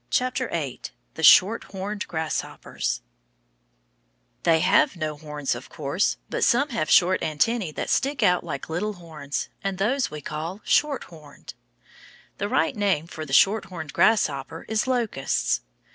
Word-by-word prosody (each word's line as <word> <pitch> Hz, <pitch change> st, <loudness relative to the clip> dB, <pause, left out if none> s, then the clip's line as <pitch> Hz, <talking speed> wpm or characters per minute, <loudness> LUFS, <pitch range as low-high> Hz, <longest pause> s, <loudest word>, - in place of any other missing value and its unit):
THE 170 Hz, -, -3 dB
SHORTHORNED 200 Hz, +3 st, +4 dB
GRASSHOPPERS 160 Hz, -2 st, -3 dB, 1.4 s
They 165 Hz, -2 st, +3 dB
have 305 Hz, -, +3 dB
no 155 Hz, -3 st, -3 dB
horns, 150 Hz, -2 st, -3 dB
of 120 Hz, +2 st, -9 dB
course, 150 Hz, +6 st, -1 dB
but -, -, -2 dB
some 280 Hz, +5 st, +3 dB
have 230 Hz, -, -2 dB
short 185 Hz, +1 st, +5 dB
antennæ 160 Hz, +3 st, 0 dB
that -, -, -3 dB
stick 275 Hz, -2 st, +1 dB
out 180 Hz, -3 st, +3 dB
like -, -, -5 dB
little 200 Hz, +7 st, -2 dB
horns, 155 Hz, -6 st, -6 dB
and 195 Hz, -1 st, -2 dB
those 245 Hz, +7 st, +1 dB
we 150 Hz, -, -7 dB
call 160 Hz, +7 st, -5 dB
shorthorned. 165 Hz, -, -2 dB, 0.9 s
The 205 Hz, -, -2 dB
right 160 Hz, -, +1 dB
name 195 Hz, -7 st, +1 dB
for 160 Hz, -2 st, -8 dB
the -, -, -9 dB
shorthorned 180 Hz, -5 st, +2 dB
grasshoppers 160 Hz, -8 st, +1 dB
is 220 Hz, +2 st, 0 dB
locusts. 225 Hz, -, 0 dB
180 Hz, 130 wpm, -25 LUFS, 155-215 Hz, 1.4 s, short